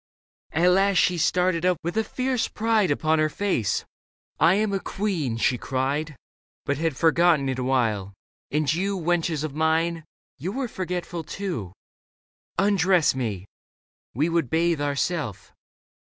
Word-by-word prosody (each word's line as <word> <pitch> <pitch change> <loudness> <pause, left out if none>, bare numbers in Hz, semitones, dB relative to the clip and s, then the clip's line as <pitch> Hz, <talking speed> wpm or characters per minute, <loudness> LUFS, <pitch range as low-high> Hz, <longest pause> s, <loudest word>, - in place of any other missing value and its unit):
At 175 +3 +3
last 195 +1 +3
she 175 0 +3
started 180 +1 +1
up 180 -1 +2
with 170 +2 -3
a 220 - +2
fierce 255 +1 -1
pride 220 -3 +1
Upon 155 +2 +1
her 155 0 +2
face. 185 - -1 0.3
" - - -53
I 165 +4 +5
am 210 0 0
a 195 - 0
queen," 180 - -2
she 125 +1 +1
cried, 140 +5 -2 0.3
" - - -84
But 140 0 -1
had 160 -4 -1
forgotten 165 -3 +3
it 130 -1 -2
a - - -1
while; 110 -7 0 0.4
and 150 0 +1
you. 195 +4 -1
Wenches 165 -3 0
of 155 -3 -4
mine, 160 +2 +1 0.4
you 180 +8 -4
were 265 0 -2
forgetful 180 -4 -4
too. 165 - -5 0.8
Undress 190 -4 +3
me. 110 -8 -3 0.7
We 150 +6 +2
would 165 -6 0
bathe 165 -1 +1
ourself." 145 - -2
165 Hz, 150 wpm, -25 LUFS, 140-185 Hz, 0.8 s, I